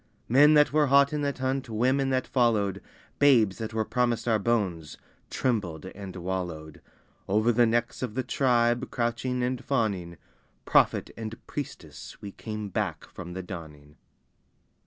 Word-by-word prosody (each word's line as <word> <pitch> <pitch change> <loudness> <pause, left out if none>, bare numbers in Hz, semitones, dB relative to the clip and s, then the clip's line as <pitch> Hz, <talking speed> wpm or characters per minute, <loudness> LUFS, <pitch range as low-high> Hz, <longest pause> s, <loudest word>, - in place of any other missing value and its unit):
Men 145 +5 +6
that 150 -1 +4
were 150 -1 +4
hot 140 +2 +5
in 150 - -1
that 140 -1 -2
hunt, 130 -1 -2
women 130 +5 +1
that 130 -1 0
followed, 105 -6 +1 0.4
Babes 120 -9 +4
that 110 -1 -4
were 110 0 -1
promised 120 0 0
our 110 -2 +3
bones, 95 -9 -1 0.3
trembled 100 - -2
and 95 0 -9
wallowed: 85 -4 -5 0.5
Over 110 +4 +3
the 120 0 +4
necks 120 +1 -1
of 120 -4 -4
the 130 - -1
tribe 120 -2 +1
crouching 125 +1 -1
and 125 0 -2
fawning 100 - -1 0.5
Prophet - - +3
and 110 0 -6
priestess 90 - -8
we 100 - -8
came 105 0 -6
back - - -3
from 90 -1 -8
the 95 +1 -5
dawning! 75 -5 -10
115 Hz, 150 wpm, -27 LUFS, 95-130 Hz, 0.5 s, Men